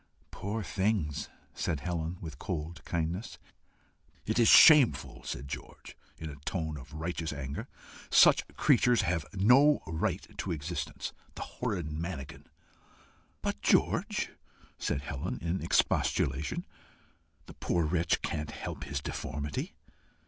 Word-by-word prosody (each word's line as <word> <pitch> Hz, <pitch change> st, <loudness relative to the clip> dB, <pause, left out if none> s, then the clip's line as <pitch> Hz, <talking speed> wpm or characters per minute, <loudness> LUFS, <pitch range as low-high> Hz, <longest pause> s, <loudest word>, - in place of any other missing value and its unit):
"Poor 105 Hz, +3 st, -4 dB
things!" 95 Hz, -8 st, -1 dB, 0.2 s
said 75 Hz, -5 st, -2 dB
Helen, 85 Hz, 0 st, -3 dB
with 80 Hz, -5 st, -8 dB
cold 80 Hz, -2 st, -4 dB
kindness. 85 Hz, +5 st, -2 dB, 0.9 s
"It 110 Hz, +2 st, 0 dB
is 115 Hz, -, +5 dB
shameful!" 150 Hz, -1 st, +7 dB
said 70 Hz, -, -5 dB
George, -, -, -8 dB, 0.2 s
in 80 Hz, -, -6 dB
a 70 Hz, -, -10 dB
tone 80 Hz, -2 st, -2 dB
of 70 Hz, 0 st, -10 dB
righteous 80 Hz, 0 st, -3 dB
anger. 70 Hz, -1 st, -5 dB, 0.4 s
"Such -, -, +6 dB
creatures 120 Hz, -3 st, +4 dB
have 85 Hz, -4 st, -1 dB
no 130 Hz, +9 st, +5 dB
right 80 Hz, 0 st, -2 dB
to 95 Hz, -, -2 dB
existence. 85 Hz, +2 st, -4 dB, 0.2 s
The -, -, -4 dB
horrid 95 Hz, -11 st, -3 dB
manakin!" 75 Hz, -3 st, -6 dB, 1.0 s
"But, 70 Hz, -, -2 dB
George!" -, -, +2 dB, 0.5 s
said 70 Hz, -, -1 dB
Helen, 70 Hz, -2 st, -4 dB
in 85 Hz, +3 st, -2 dB
expostulation, 70 Hz, +3 st, +1 dB, 0.8 s
"the -, -, -11 dB
poor 85 Hz, -2 st, 0 dB
wretch 85 Hz, +1 st, +1 dB
can't 75 Hz, -1 st, -2 dB
help -, -, -6 dB
his 70 Hz, 0 st, -3 dB
deformity." 70 Hz, 0 st, -4 dB
80 Hz, 120 wpm, -30 LUFS, 75-95 Hz, 1.0 s, shameful